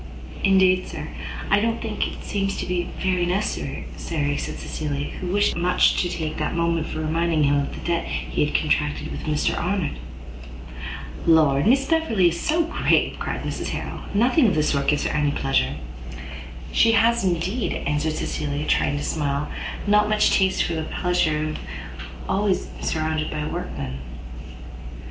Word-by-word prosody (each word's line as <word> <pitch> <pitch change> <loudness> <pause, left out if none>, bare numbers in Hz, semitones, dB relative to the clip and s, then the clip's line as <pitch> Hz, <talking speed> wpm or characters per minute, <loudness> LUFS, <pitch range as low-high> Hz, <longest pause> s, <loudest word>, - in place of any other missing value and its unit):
"Indeed, 190 -1 +4
sir, - - -6 0.4
I 205 - +6
don't 230 +2 0
think 220 -2 -2
it - - -8
seems 195 -1 -1
to - - -3
be 180 -1 -1
very 185 -2 +1
necessary," 185 +4 -2
said 145 -3 -2
Cecilia, 145 -2 -3
who 185 - -6
wished 205 +3 +2
much 180 +1 +3
to 175 - -1
take 160 -2 -3
that - - -1
moment 170 -1 +1
for 155 - -4
reminding 160 0 +1
him 145 0 +3
of 140 - -2
the - - -9
debt 170 -1 0
he - - -1
had 150 - -2
contracted 150 -1 0
with - - -6
Mr 150 -1 +1
Arnott. 180 -2 -1 1.3
"Lord, 155 -2 +5
Miss 270 +3 +4
Beverley 270 - +3
is 170 - -4
so 330 +2 +2
grave!" 335 - +1
cried - - -3
Mrs - - -3
Harrel; - - -4 0.2
"nothing 245 +5 +4
of 195 - +2
this 155 -1 +2
sort 140 -1 0
gives 150 - +2
her - - 0
any 150 -1 +2
pleasure." 135 - +1 1.0
"She 225 0 +5
has 230 +1 +4
indeed," 185 +6 0
answered 150 +2 0
Cecilia, 150 -1 -2
trying 145 - +2
to 145 - -3
smile, 145 -2 -1 0.3
"not 210 +1 +4
much 215 0 +3
taste 190 -1 +3
for 170 - -2
the 160 - -1
pleasure 160 -1 +1
of - - -3
being - - -5 0.7
always 195 0 +1
surrounded 155 -1 -1
by 150 -1 -3
workmen." 70 - -4
170 Hz, 165 wpm, -23 LUFS, 150-195 Hz, 1.3 s, I